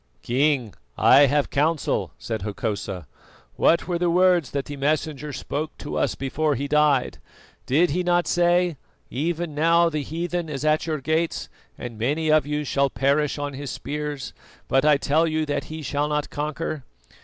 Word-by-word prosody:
"King, 130 Hz, -3 st, +1 dB, 0.2 s
I 140 Hz, +1 st, +7 dB
have 145 Hz, +1 st, +1 dB
counsel," 155 Hz, +2 st, 0 dB
said 110 Hz, -3 st, -4 dB
Hokosa. 100 Hz, -3 st, -4 dB, 0.5 s
"What 165 Hz, -, +3 dB
were 175 Hz, -2 st, -1 dB
the 175 Hz, 0 st, +2 dB
words 180 Hz, -3 st, +3 dB
that 140 Hz, -1 st, -3 dB
the 145 Hz, -, -6 dB
Messenger 150 Hz, +1 st, -1 dB
spoke 145 Hz, +3 st, -4 dB
to 145 Hz, -, -6 dB
us -, -, 0 dB
before 145 Hz, +2 st, -1 dB
he 140 Hz, +3 st, -3 dB
died? 150 Hz, -2 st, +2 dB, 0.5 s
Did 160 Hz, +6 st, +3 dB
he 180 Hz, +5 st, 0 dB
not 175 Hz, -1 st, +2 dB
say: 175 Hz, -2 st, +2 dB, 0.3 s
'Even 165 Hz, +4 st, -2 dB
now 165 Hz, +3 st, +4 dB
the 155 Hz, -2 st, -2 dB
heathen 170 Hz, +3 st, -3 dB
is 145 Hz, 0 st, -4 dB
at 155 Hz, +1 st, +2 dB
your 155 Hz, -3 st, -2 dB
gates, 160 Hz, +3 st, -1 dB, 0.3 s
and 115 Hz, -3 st, -7 dB
many 150 Hz, +7 st, 0 dB
of 155 Hz, -1 st, +4 dB
you 150 Hz, 0 st, -1 dB
shall 140 Hz, -1 st, +1 dB
perish 140 Hz, +5 st, +1 dB
on 145 Hz, -1 st, -3 dB
his 140 Hz, 0 st, -6 dB
spears; 150 Hz, -1 st, -5 dB, 0.3 s
but 135 Hz, -, +2 dB
I 150 Hz, -2 st, +6 dB
tell 155 Hz, +4 st, +2 dB
you 155 Hz, 0 st, 0 dB
that 145 Hz, -1 st, -2 dB
he 155 Hz, 0 st, -7 dB
shall 145 Hz, +1 st, -1 dB
not 150 Hz, -1 st, -2 dB
conquer'? 150 Hz, 0 st, -3 dB
150 Hz, 170 wpm, -24 LUFS, 140-160 Hz, 0.5 s, I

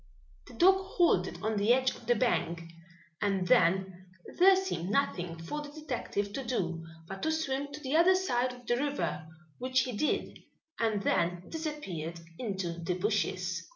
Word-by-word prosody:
The -, -, -12 dB
dog 380 Hz, +2 st, +6 dB
halted 350 Hz, -, +1 dB
on 220 Hz, 0 st, 0 dB
the 205 Hz, +3 st, +3 dB
edge 260 Hz, +1 st, +4 dB
of -, -, -15 dB
the 240 Hz, -, +4 dB
bank, 170 Hz, -8 st, 0 dB, 0.6 s
and 195 Hz, -3 st, +1 dB
then 190 Hz, -3 st, +2 dB, 0.3 s
there 380 Hz, +2 st, +8 dB
seemed 375 Hz, -, -2 dB
nothing 180 Hz, -8 st, 0 dB
for 165 Hz, -, -5 dB
the 295 Hz, -, -8 dB
detective 250 Hz, -9 st, -3 dB
to 270 Hz, -, -3 dB
do 175 Hz, -9 st, -2 dB, 0.2 s
but 195 Hz, +1 st, -7 dB
to 315 Hz, -, +1 dB
swim 285 Hz, -3 st, -2 dB
to 295 Hz, -, -7 dB
the 275 Hz, +1 st, -1 dB
other 350 Hz, +3 st, +6 dB
side 255 Hz, -9 st, +1 dB
of 250 Hz, 0 st, -13 dB
the 240 Hz, +1 st, +1 dB
river, 280 Hz, -, -2 dB, 0.3 s
which 255 Hz, +1 st, +2 dB
he 250 Hz, -, -2 dB
did, 245 Hz, +7 st, -1 dB, 0.4 s
and 220 Hz, -3 st, +1 dB
then 175 Hz, 0 st, +1 dB
disappeared 195 Hz, -, -4 dB, 0.2 s
into 190 Hz, -7 st, -3 dB
the 180 Hz, +1 st, -1 dB
bushes. 210 Hz, +3 st, -1 dB
240 Hz, 165 wpm, -31 LUFS, 185-290 Hz, 0.6 s, there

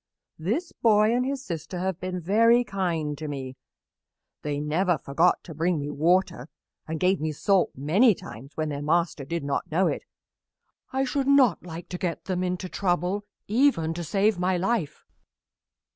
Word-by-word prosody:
This 235 Hz, -, -2 dB
boy 215 Hz, 0 st, +3 dB
and 250 Hz, -, +2 dB
his 275 Hz, -1 st, -3 dB
sister 170 Hz, +1 st, -5 dB
have 185 Hz, 0 st, -2 dB
been 185 Hz, 0 st, -3 dB
very 230 Hz, +7 st, +4 dB
kind 175 Hz, -8 st, -2 dB
to 155 Hz, -, -5 dB
me. 135 Hz, -3 st, -5 dB, 0.9 s
They 145 Hz, -1 st, -2 dB
never 165 Hz, +4 st, +1 dB
forgot 165 Hz, +6 st, +1 dB
to 165 Hz, -, -9 dB
bring 165 Hz, +3 st, 0 dB
me 145 Hz, 0 st, -3 dB
water 165 Hz, -3 st, +1 dB, 0.4 s
and 160 Hz, 0 st, -3 dB
gave 185 Hz, 0 st, +2 dB
me 155 Hz, 0 st, -1 dB
salt 190 Hz, +5 st, +2 dB
many 185 Hz, -, +4 dB
times 135 Hz, +3 st, -11 dB
when 155 Hz, -1 st, -1 dB
their 145 Hz, -1 st, -4 dB
master 155 Hz, -1 st, 0 dB
did 165 Hz, +2 st, -3 dB
not 140 Hz, 0 st, -2 dB
know 180 Hz, +5 st, +3 dB
it. -, -, -2 dB, 0.9 s
I 265 Hz, +1 st, 0 dB
should 270 Hz, +1 st, -1 dB
not 280 Hz, -5 st, +5 dB
like 170 Hz, -1 st, -8 dB
to 180 Hz, -, -5 dB
get 175 Hz, -3 st, -3 dB
them 185 Hz, -1 st, -1 dB
into 180 Hz, 0 st, -2 dB
trouble, 180 Hz, +2 st, -1 dB, 0.2 s
even 215 Hz, -, +2 dB
to 170 Hz, +1 st, -5 dB
save 195 Hz, +4 st, +1 dB
my 180 Hz, 0 st, +1 dB
life." 185 Hz, -5 st, -1 dB
180 Hz, 170 wpm, -26 LUFS, 155-200 Hz, 0.9 s, not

